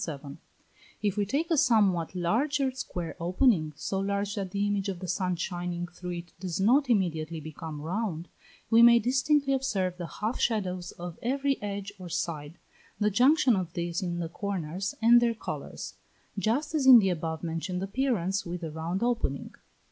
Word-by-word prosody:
If 205 -2 +1
we 205 -2 0
take 310 - -1
a 325 - +4
somewhat 195 - +3
larger 260 - +1
square 175 -10 -5
opening, 175 - +2
so 190 +5 -3
large 200 +1 -1
that 195 -3 -3
the 200 +2 -1
image 205 -1 0
of 190 - -3
the 185 +1 -7
sun 180 0 0
shining 175 0 -3
through 175 0 -7
it 170 0 -8
does 180 -1 -3
not 255 +7 +4
immediately 165 -7 0
become 155 0 -7
round, 175 +1 -3 0.4
we 225 +1 +7
may 235 0 +8
distinctly 275 +4 +2
observe 195 -9 -1
the 175 -2 -5
half 215 +8 -3
shadows 185 -6 -1
of 175 -1 -8
every 275 +3 0
edge 200 -1 -4
or 180 -1 -8
side, 155 -1 -3 0.4
the 210 0 +2
junction 260 +3 +4
of 180 -3 -3
these 170 0 -2
in 175 -2 -2
the 170 -1 -2
corners, 190 0 -4
and 240 +1 +7
their 235 -1 +2
colours; - - -6 0.4
just 235 +10 0
as 290 -4 +1
in 255 -2 +11
the 195 -4 +4
above 165 -2 -3
mentioned 170 +3 -3
appearance 200 -4 0
with 175 0 -5
the 165 -2 -5
round 165 +6 -3
opening. 235 - -1
195 Hz, 170 wpm, -28 LUFS, 175-235 Hz, 0.4 s, in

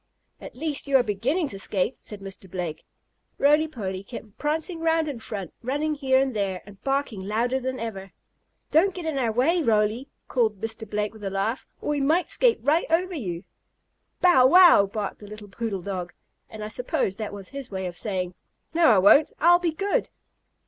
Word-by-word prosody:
"At - - -10
least 290 +1 -3
you 275 -1 +5
are 250 - +3
beginning 250 - 0
to 195 - -6
skate," 195 +5 -1
said 210 -2 -5
Mr. 195 -1 -9
Blake. 175 -4 -5 0.5
Roly 300 +3 +4
Poly 195 -9 -5
kept 210 -1 -10
prancing 320 +3 -2
around 325 -1 +2
in 275 -5 -5
front, 200 -5 -6
running 290 +5 -1
here 265 -3 +2
and 265 -2 +1
there, 195 -3 -2
and 200 -1 -15
barking 270 -7 -1
louder 240 +5 0
than 260 0 -4
ever. 195 -4 -6 0.6
"Don't 355 +5 +3
get 355 -3 -6
in 310 -4 -1
our 235 -3 +1
way, 295 +10 +2
Roly!" 225 +1 +1 0.2
called 220 -6 0
Mr. 220 0 -5
Blake 210 0 -2
with 220 -2 -13
a 195 - -2
laugh, 195 +5 -2
"or - - -4
we 295 -1 0
might 320 +6 +2
skate 485 -2 +3
right 300 +6 +2
over 360 +3 +1
you!" 185 - -4 0.8
"Bow 305 -9 +6
wow!" 345 - +7
barked 205 0 -4
the 205 - -11
little 210 0 -10
poodle 195 -3 -4
dog. 180 -3 -5 0.4
And 215 -1 -8
I - - -4
suppose 215 -4 -2
that 215 -2 -4
was 200 -2 -9
his 275 -2 -7
way 190 -1 -4
of 175 -1 -5
saying: 185 -3 -3 0.4
"No, 335 0 +4
I 220 - +6
won't! 200 +11 +6
I'll 350 +2 +6
be 345 -2 0
good." 400 +9 -1
235 Hz, 195 wpm, -25 LUFS, 200-300 Hz, 0.8 s, wow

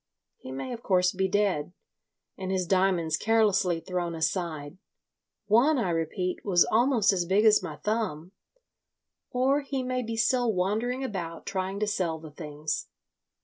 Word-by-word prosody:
He 130 - -9
may 135 - -5
of 235 - -7
course 180 -3 +2
be 190 +1 0
dead, 190 -5 0 0.6
and 190 -1 -5
his 185 -1 0
diamonds 180 -4 +2
carelessly 205 -6 +2
thrown 175 -2 -3
aside—one, 180 - -1
I 195 -8 0
repeat, 170 +3 -2
was 180 -4 +4
almost 230 -3 +3
as 180 -2 0
big 195 +5 +2
as 215 -1 +6
my - - -6
thumb. 190 -7 -2 1.0
Or 265 +3 +2
he 275 -2 -3
may 255 0 -1
be 230 -1 -4
still 245 +1 +2
wandering 220 +8 -1
about 170 -9 -5
trying 190 +1 -3
to - - +3
sell 180 -6 -1
the 160 -1 -11
things. 150 -1 -4
190 Hz, 145 wpm, -27 LUFS, 170-225 Hz, 1.0 s, as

